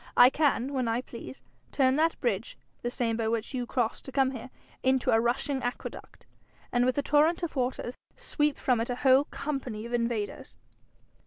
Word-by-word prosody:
I 250 Hz, +1 st, +9 dB
can, 280 Hz, -3 st, +1 dB
when 255 Hz, -3 st, 0 dB
I 230 Hz, +2 st, 0 dB
please, 255 Hz, +2 st, -10 dB, 0.3 s
turn 260 Hz, -2 st, +3 dB
that 325 Hz, +1 st, +2 dB
bridge, 230 Hz, -3 st, -2 dB, 0.2 s
the 240 Hz, -, -2 dB
same 235 Hz, -2 st, -1 dB
by 225 Hz, -1 st, -1 dB
which 225 Hz, +3 st, -2 dB
you 250 Hz, -2 st, -2 dB
cross 235 Hz, -3 st, -1 dB
to 270 Hz, -, -9 dB
come 265 Hz, 0 st, +2 dB
here, 255 Hz, 0 st, -7 dB, 0.3 s
into 260 Hz, -1 st, +2 dB
a 225 Hz, -, +5 dB
rushing 260 Hz, +3 st, 0 dB
aqueduct, 245 Hz, +1 st, -6 dB, 0.5 s
and 245 Hz, 0 st, +3 dB
with 255 Hz, -, 0 dB
a 285 Hz, -, +1 dB
torrent 310 Hz, +5 st, +3 dB
of 335 Hz, -, -3 dB
water 250 Hz, -2 st, -1 dB, 0.2 s
sweep 295 Hz, -2 st, 0 dB
from 245 Hz, -3 st, +1 dB
it 230 Hz, -, -3 dB
a 245 Hz, -, -1 dB
whole 265 Hz, +2 st, +6 dB
company 255 Hz, -9 st, -4 dB
of 235 Hz, -, -7 dB
invaders.' 230 Hz, -3 st, -2 dB
255 Hz, 185 wpm, -29 LUFS, 235-270 Hz, 0.5 s, I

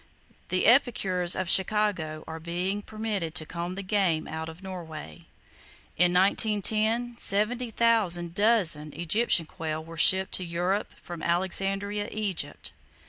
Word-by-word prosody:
The 185 Hz, -, +1 dB
epicures 195 Hz, -8 st, +3 dB
of 185 Hz, -, -2 dB
Chicago 190 Hz, -6 st, +2 dB
are 160 Hz, 0 st, -7 dB
being 180 Hz, +5 st, -3 dB
permitted 210 Hz, -7 st, -4 dB
to 155 Hz, -, -1 dB
comb 175 Hz, +2 st, -5 dB
the 195 Hz, -, -5 dB
game 185 Hz, -5 st, 0 dB
out 160 Hz, +1 st, -5 dB
of 165 Hz, +4 st, -12 dB
Norway. 170 Hz, -3 st, -9 dB, 0.7 s
In 175 Hz, +1 st, +3 dB
1910, 220 Hz, +4 st, +2 dB
70,000 215 Hz, -5 st, +2 dB
dozen 185 Hz, -8 st, +2 dB
Egyptian 175 Hz, +1 st, +1 dB
quail 155 Hz, 0 st, -5 dB
were 165 Hz, 0 st, -11 dB
shipped 190 Hz, +3 st, +5 dB
to 185 Hz, -, +1 dB
Europe 180 Hz, +4 st, -2 dB
from 175 Hz, -2 st, -8 dB
Alexandria, 195 Hz, +3 st, -1 dB
Egypt. 210 Hz, -5 st, -2 dB
185 Hz, 125 wpm, -27 LUFS, 170-210 Hz, 0.7 s, shipped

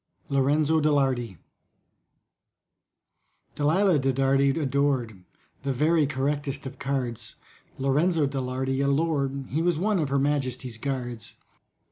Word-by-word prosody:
LORENZO 145 Hz, +3 st, +2 dB
DE 155 Hz, -, +3 dB
LARDY 130 Hz, -, 0 dB, 2.2 s
DALILAH 165 Hz, +3 st, +3 dB
DE 135 Hz, 0 st, +1 dB
DARDY 135 Hz, +1 st, +2 dB
adored 135 Hz, -, 0 dB, 0.4 s
The 140 Hz, -, -2 dB
very 155 Hz, +3 st, +2 dB
correctest 140 Hz, 0 st, -2 dB
of 135 Hz, 0 st, -8 dB
cards, 130 Hz, -4 st, -3 dB, 0.4 s
LORENZO 150 Hz, +4 st, +2 dB
DE 135 Hz, -1 st, -2 dB
LARDY, 130 Hz, +1 st, -2 dB
a 140 Hz, -, +1 dB
lord— 140 Hz, -2 st, 0 dB
He 155 Hz, +5 st, -1 dB
was 175 Hz, -1 st, +1 dB
one 200 Hz, +3 st, +1 dB
of 150 Hz, -4 st, -1 dB
Her 140 Hz, -, +1 dB
Majesty's 130 Hz, -4 st, -1 dB
Guards. 120 Hz, -4 st, -4 dB
140 Hz, 120 wpm, -26 LUFS, 130-150 Hz, 2.2 s, DE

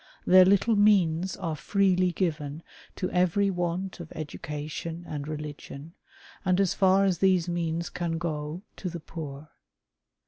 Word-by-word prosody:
Their 185 Hz, 0 st, +8 dB
little 200 Hz, +4 st, +4 dB
means 190 Hz, -4 st, +3 dB
are 165 Hz, -5 st, -3 dB
freely 185 Hz, +3 st, +2 dB
given 155 Hz, -4 st, -2 dB, 0.3 s
to 185 Hz, -, -3 dB
every 185 Hz, +3 st, +2 dB
want 180 Hz, +1 st, -3 dB
of 170 Hz, -2 st, -9 dB
education 155 Hz, +2 st, -6 dB
and 145 Hz, -1 st, -5 dB
religion, 150 Hz, 0 st, -7 dB, 0.5 s
and, 185 Hz, -1 st, +2 dB
as 195 Hz, -3 st, +2 dB
far 195 Hz, 0 st, +4 dB
as 185 Hz, -4 st, +1 dB
these 185 Hz, -3 st, +3 dB
means 170 Hz, -1 st, -2 dB
can 170 Hz, -2 st, -2 dB
go, 160 Hz, +1 st, -4 dB
to 185 Hz, -, -4 dB
the 170 Hz, 0 st, -6 dB
poor. 150 Hz, -2 st, -8 dB
175 Hz, 140 wpm, -27 LUFS, 155-185 Hz, 0.5 s, Their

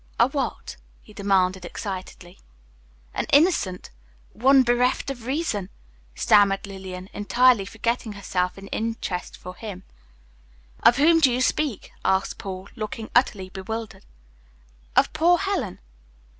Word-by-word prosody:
"A -, -, +6 dB
what?" -, -, -4 dB, 0.3 s
he -, -, -16 dB
demanded, 190 Hz, -2 st, +1 dB
excitedly. 185 Hz, -1 st, -7 dB, 0.7 s
"An -, -, -2 dB
innocent, 285 Hz, -, +2 dB, 0.4 s
one 265 Hz, +3 st, +5 dB
bereft 250 Hz, +3 st, +1 dB
of 240 Hz, -3 st, -9 dB
reason," 260 Hz, -, -2 dB, 0.5 s
stammered 200 Hz, -, +4 dB
Lillian, 190 Hz, -2 st, -8 dB
entirely 240 Hz, +1 st, +3 dB
forgetting 225 Hz, +1 st, -2 dB
herself 185 Hz, -2 st, -2 dB
in 195 Hz, -, -10 dB
her 195 Hz, -, -10 dB
interest 220 Hz, -5 st, -3 dB
for 180 Hz, -, -9 dB
him. 190 Hz, -1 st, -8 dB, 1.0 s
"Of 240 Hz, -, +6 dB
whom 325 Hz, +3 st, +5 dB
do 275 Hz, -5 st, +5 dB
you 245 Hz, -, 0 dB
speak?" 260 Hz, -2 st, -1 dB
asked 190 Hz, 0 st, 0 dB
Paul, 190 Hz, 0 st, -6 dB
looking 220 Hz, -1 st, -6 dB
utterly 205 Hz, -7 st, +2 dB
bewildered, 200 Hz, +1 st, -6 dB, 0.9 s
"Of -, -, +3 dB
poor 350 Hz, +2 st, +4 dB
Helen." 375 Hz, -, -2 dB
210 Hz, 125 wpm, -24 LUFS, 190-250 Hz, 1.0 s, A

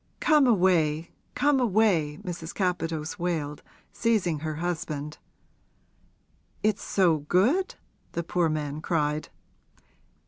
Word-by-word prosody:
Come 300 Hz, -4 st, +4 dB
away 170 Hz, -7 st, +2 dB, 0.2 s
come 290 Hz, -1 st, +3 dB
away!' 195 Hz, -10 st, +2 dB
Mrs. 170 Hz, -3 st, -6 dB
Capadose 165 Hz, -5 st, -2 dB
wailed, 160 Hz, -4 st, -2 dB, 0.3 s
seizing 195 Hz, -9 st, +1 dB
her 155 Hz, 0 st, -4 dB
husband. 150 Hz, -3 st, -4 dB, 1.4 s
'It's 215 Hz, -1 st, +1 dB
so 175 Hz, -5 st, +2 dB
good?' 215 Hz, -, +2 dB, 0.4 s
the 170 Hz, -, -2 dB
poor 170 Hz, 0 st, +1 dB
man 150 Hz, -1 st, -3 dB
cried. 150 Hz, -2 st, -1 dB
170 Hz, 100 wpm, -27 LUFS, 155-200 Hz, 1.4 s, Come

